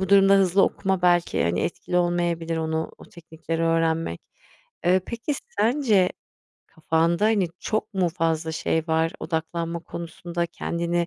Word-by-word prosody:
bu 190 Hz, -, -1 dB
durumda 195 Hz, 0 st, +6 dB
hızlı 195 Hz, 0 st, +4 dB
okuma 190 Hz, -2 st, 0 dB
belki, 175 Hz, -1 st, +3 dB
hani, 85 Hz, +2 st, 0 dB
etkili 180 Hz, -, -2 dB
olmayabilir; 175 Hz, -2 st, 0 dB
onu, 160 Hz, 0 st, -2 dB
o -, -, -13 dB
teknikleri 165 Hz, 0 st, -6 dB
öğrenmek. 165 Hz, -, +1 dB, 0.7 s
Eee, 185 Hz, +1 st, +5 dB
peki, 235 Hz, +5 st, -3 dB, 0.2 s
sence 215 Hz, -5 st, +3 dB, 0.6 s
kafanda, 165 Hz, +4 st, +1 dB
hani, 210 Hz, -5 st, +3 dB
çok 215 Hz, 0 st, -2 dB
mu 185 Hz, -2 st, +2 dB
fazla 160 Hz, -1 st, -1 dB
şey 160 Hz, 0 st, 0 dB
var? 160 Hz, +2 st, +1 dB
Odaklanma 165 Hz, +1 st, -3 dB
konusunda, 170 Hz, +1 st, -5 dB
kendini 170 Hz, 0 st, -2 dB
170 Hz, 135 wpm, -24 LUFS, 165-190 Hz, 0.7 s, durumda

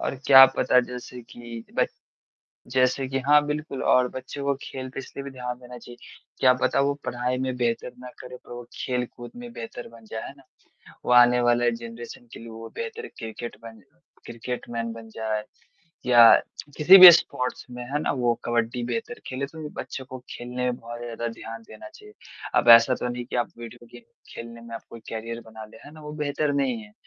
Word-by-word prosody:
और -, -, -2 dB
क्या 135 Hz, -1 st, +10 dB
पता 125 Hz, -, +4 dB
जैसे 125 Hz, 0 st, -8 dB
कि 115 Hz, -1 st, -9 dB
ब -, -, +4 dB, 0.8 s
जैसे 130 Hz, +1 st, +2 dB
कि 135 Hz, 0 st, -1 dB
हाँ 150 Hz, 0 st, +5 dB
बिल्कुल 150 Hz, -2 st, -4 dB
और 125 Hz, 0 st, +3 dB
बच्चों 130 Hz, +2 st, -7 dB
को 140 Hz, 0 st, +1 dB
खेल 130 Hz, -1 st, -7 dB
पे -, -, -6 dB
इसलिए 135 Hz, +1 st, -9 dB
भी 140 Hz, -, -7 dB
ध्यान 125 Hz, -2 st, -6 dB
देना 125 Hz, 0 st, -12 dB
चाहिए। 120 Hz, +1 st, -13 dB, 0.4 s
क्या 130 Hz, -1 st, +6 dB
पता 125 Hz, -, +1 dB
वो 140 Hz, +1 st, +1 dB
पढ़ाई 125 Hz, +1 st, -2 dB
में 130 Hz, -1 st, -2 dB
बेहतर 120 Hz, 0 st, -1 dB
ना 125 Hz, -, -9 dB
करे 125 Hz, 0 st, -9 dB
पर 125 Hz, -, -15 dB
वो 120 Hz, 0 st, -7 dB
खेल 125 Hz, -1 st, -2 dB
कूद 120 Hz, 0 st, -9 dB
में 245 Hz, 0 st, -9 dB
बेहतर 225 Hz, -1 st, -8 dB
बन 115 Hz, -1 st, -15 dB
जाएँ 110 Hz, -, -5 dB
है -, -, -8 dB
ना। 135 Hz, -, -19 dB, 0.6 s
वो -, -, 0 dB
आने 125 Hz, 0 st, +6 dB
वाले 120 Hz, 0 st, +3 dB
जनरेशन 115 Hz, +1 st, -9 dB
के -, -, -9 dB
लिए 115 Hz, -, -10 dB
वो 115 Hz, 0 st, -9 dB
बेहतर, 460 Hz, -1 st, -6 dB
क्रिकेटमैन 115 Hz, 0 st, -8 dB, 0.5 s
क्रिकेटमैन 115 Hz, -1 st, -5 dB
बन 115 Hz, 0 st, -11 dB
जाए 110 Hz, -1 st, -3 dB, 0.6 s
या 120 Hz, -2 st, +8 dB, 0.4 s
किसी 175 Hz, +6 st, +8 dB
भी 185 Hz, -1 st, +14 dB
स्पोर्ट्स 125 Hz, -6 st, -1 dB
में 125 Hz, 0 st, -7 dB
है 140 Hz, +4 st, -2 dB
ना, -, -, 0 dB
वो 120 Hz, -3 st, +1 dB
कबड्डी 120 Hz, +1 st, -1 dB
बेहतर 230 Hz, -, -4 dB
खेले 135 Hz, +2 st, -3 dB
तो 160 Hz, +3 st, -14 dB
भी 150 Hz, -, -5 dB
बच्चों 130 Hz, -, -7 dB
को 130 Hz, -, -7 dB
खेलने 125 Hz, +1 st, -5 dB
में 120 Hz, -, -4 dB
बहुत 120 Hz, 0 st, -9 dB
ज़्यादा 120 Hz, -1 st, -5 dB
ध्यान 115 Hz, 0 st, -9 dB
देना 325 Hz, -, -11 dB
चाहिए। 420 Hz, +3 st, -15 dB, 0.5 s
अब -, -, -3 dB
ऐसा 115 Hz, +3 st, +2 dB
तो 125 Hz, -, -4 dB
नहीं 120 Hz, 0 st, -5 dB
कि 120 Hz, -, -5 dB
आप 120 Hz, -, 0 dB
वीडियो 120 Hz, 0 st, -11 dB
गेम 120 Hz, 0 st, -12 dB, 0.3 s
खेलने 115 Hz, 0 st, -9 dB
में 115 Hz, 0 st, -10 dB
आप 115 Hz, -, -7 dB
कोई 115 Hz, -, -10 dB
करियर 115 Hz, +1 st, -5 dB
बना 110 Hz, 0 st, -9 dB
ले 110 Hz, -, -15 dB
है 145 Hz, -, -12 dB
ना, 155 Hz, -, -13 dB
वो 150 Hz, 0 st, -8 dB
बेहतर 150 Hz, -1 st, -1 dB
नहीं 135 Hz, -4 st, 0 dB
है। 105 Hz, -1 st, -16 dB
125 Hz, 205 wpm, -25 LUFS, 115-135 Hz, 0.8 s, भी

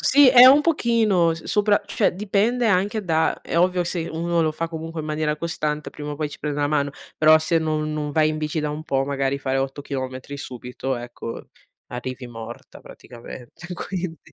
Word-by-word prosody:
sì, 280 Hz, -1 st, +6 dB
è 250 Hz, 0 st, +10 dB
un 280 Hz, +3 st, +7 dB
pochino 225 Hz, -, +2 dB
s 160 Hz, -, -11 dB
sopra 205 Hz, 0 st, +2 dB
cioè -, -, +1 dB
dipende 215 Hz, +5 st, +1 dB
anche 205 Hz, +3 st, +1 dB
da 160 Hz, -2 st, +1 dB
è 170 Hz, -, -1 dB
ovvio 180 Hz, 0 st, +2 dB
se 170 Hz, -1 st, -3 dB
uno 170 Hz, +1 st, 0 dB
lo 155 Hz, -, +1 dB
fa 165 Hz, +2 st, -3 dB
comunque 165 Hz, 0 st, -6 dB
in 155 Hz, -, -6 dB
maniera 150 Hz, 0 st, -1 dB
costante 150 Hz, -2 st, -3 dB
prima 150 Hz, 0 st, -7 dB
o 145 Hz, -, -5 dB
poi 150 Hz, 0 st, -2 dB
ci -, -, -10 dB
prende 150 Hz, -1 st, -3 dB
una 145 Hz, -, +2 dB
mano, 145 Hz, -1 st, +1 dB, 0.3 s
però 155 Hz, 0 st, +7 dB
se 160 Hz, +1 st, +1 dB
non 155 Hz, -1 st, -1 dB
non 150 Hz, -1 st, -3 dB
vai 155 Hz, 0 st, +3 dB
in 155 Hz, -, -3 dB
bici 155 Hz, +1 st, -2 dB
da 150 Hz, 0 st, -2 dB
un 150 Hz, +1 st, -5 dB
po', 135 Hz, -4 st, 0 dB
magari 135 Hz, 0 st, -1 dB
fare 135 Hz, -1 st, -1 dB
8 135 Hz, +1 st, -3 dB
chilometri 130 Hz, 0 st, -5 dB
subito, 125 Hz, 0 st, -5 dB
ecco, 120 Hz, -1 st, -8 dB, 0.4 s
arrivi 125 Hz, +1 st, -6 dB
morta 115 Hz, 0 st, -10 dB
praticamente 120 Hz, +6 st, -12 dB
quindi 180 Hz, -2 st, -5 dB
155 Hz, 195 wpm, -23 LUFS, 140-175 Hz, 0.4 s, è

